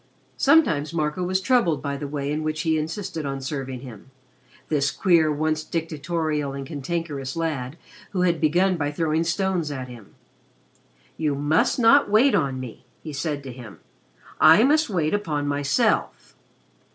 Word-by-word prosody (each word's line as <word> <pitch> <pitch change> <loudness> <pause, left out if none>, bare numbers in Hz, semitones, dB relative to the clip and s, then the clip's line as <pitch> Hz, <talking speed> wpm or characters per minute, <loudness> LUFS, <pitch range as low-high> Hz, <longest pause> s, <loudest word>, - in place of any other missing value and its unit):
Sometimes, 170 - +3
Marco 150 +2 -1
was 185 +1 0
troubled 190 - +2
by 140 -1 -2
the 145 +1 -5
way 140 0 -3
in 150 +1 -2
which 155 0 -2
he 160 0 +1
insisted 165 +2 -4
on 135 -1 -3
serving 135 -2 -5
him, 125 -3 -11 0.6
this 145 -2 +1
queer, 170 -4 +3
once 155 +1 -1
dictatorial 155 -2 -2
and 140 0 -6
cantankerous 145 -2 -4
lad 155 -4 -3 0.3
who 185 - -2
had 170 -3 +1
begun 175 +4 +2
by 145 -2 -1
throwing 160 +1 0
stones 175 -1 -1
at 130 -3 -5
him. 120 -5 -13 1.0
"You 150 -3 0
must 145 +3 +1
not 255 +1 +5
wait 230 +7 +4
on 135 -5 0
me," 125 -2 -9 0.2
he 155 - -7
said 145 +1 -3
to 135 - -7
him. 120 -4 -11 0.6
"I 160 +7 +7
must 300 +2 +3
wait 170 -5 0
upon 155 -8 -1
myself." 140 - 0
155 Hz, 155 wpm, -24 LUFS, 140-170 Hz, 1.0 s, I